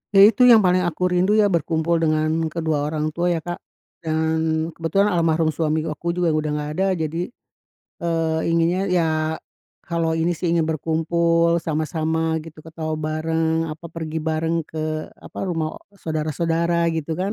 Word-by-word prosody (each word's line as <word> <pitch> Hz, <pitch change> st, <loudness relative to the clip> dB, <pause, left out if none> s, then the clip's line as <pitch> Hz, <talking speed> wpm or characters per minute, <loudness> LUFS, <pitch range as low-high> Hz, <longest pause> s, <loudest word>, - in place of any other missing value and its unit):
Ya 195 Hz, -, +9 dB
itu 230 Hz, +4 st, +6 dB
yang 225 Hz, -4 st, +8 dB
paling 180 Hz, 0 st, +4 dB
aku 175 Hz, +2 st, -3 dB
rindu 185 Hz, +4 st, +3 dB
ya 205 Hz, -2 st, +4 dB
berkumpul 165 Hz, 0 st, +1 dB
dengan 155 Hz, -1 st, +1 dB, 0.2 s
kedua 155 Hz, -2 st, -1 dB
orang 155 Hz, 0 st, -2 dB
tua 170 Hz, +3 st, -1 dB
ya, -, -, -1 dB
Kak. 175 Hz, 0 st, -5 dB, 0.4 s
Dan 160 Hz, 0 st, 0 dB
kebetulan 195 Hz, +6 st, +1 dB
almarhum 165 Hz, -2 st, +2 dB
suami 155 Hz, 0 st, 0 dB
aku 170 Hz, +2 st, -3 dB
juga 175 Hz, -2 st, +1 dB
udah 155 Hz, 0 st, 0 dB
nggak 150 Hz, 0 st, -3 dB
ada, 195 Hz, -, +3 dB
jadi, 165 Hz, +2 st, -2 dB, 0.8 s
eee, 165 Hz, -1 st, 0 dB
inginnya 170 Hz, +2 st, +2 dB
ya 175 Hz, -2 st, +3 dB, 0.8 s
kalau 165 Hz, -1 st, -1 dB
ini 165 Hz, +1 st, 0 dB
sih 170 Hz, +1 st, -1 dB
ingin 165 Hz, -2 st, +2 dB
berkumpul 165 Hz, +2 st, +1 dB
sama-sama 160 Hz, 0 st, -1 dB
gitu, 155 Hz, -1 st, -12 dB
ketawa 160 Hz, 0 st, -5 dB
bareng, 160 Hz, +1 st, 0 dB
apa 165 Hz, +2 st, -10 dB
pergi 160 Hz, -1 st, -5 dB
bareng 160 Hz, +1 st, 0 dB
ke, 155 Hz, 0 st, -3 dB
apa, -, -, -12 dB
rumah 160 Hz, -2 st, -2 dB
o -, -, -10 dB, 0.2 s
saudara-saudara 165 Hz, +1 st, 0 dB
gitu 160 Hz, 0 st, -3 dB
kan. 195 Hz, +3 st, -1 dB
165 Hz, 160 wpm, -22 LUFS, 155-170 Hz, 0.8 s, Ya